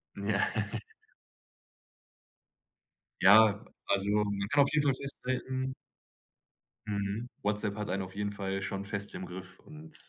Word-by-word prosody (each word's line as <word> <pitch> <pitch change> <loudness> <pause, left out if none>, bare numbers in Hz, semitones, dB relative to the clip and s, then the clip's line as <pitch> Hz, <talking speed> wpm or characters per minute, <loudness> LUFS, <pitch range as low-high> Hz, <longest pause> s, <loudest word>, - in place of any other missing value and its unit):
Mhm. 100 0 -5
Ja. 100 -2 +3 2.7
Ja, 105 +2 +7 0.2
also, 100 0 +1
man 100 -1 +1
kann 145 0 +6
auf - - -2
jeden 150 -1 +3
Fall 135 - +4
festhalten 130 -1 -3 1.1
Mhm. 105 +3 -2
WhatsApp 105 0 0
hat 105 -1 -3
einen 95 +1 -1
auf 95 0 -8
jeden 105 0 -2
Fall 95 -1 -2
schon 95 +1 -3
fest 100 0 -4
im 95 - -5
Griff 95 +1 -9
und 155 +1 -12
105 Hz, 130 wpm, -31 LUFS, 100-125 Hz, 2.7 s, Ja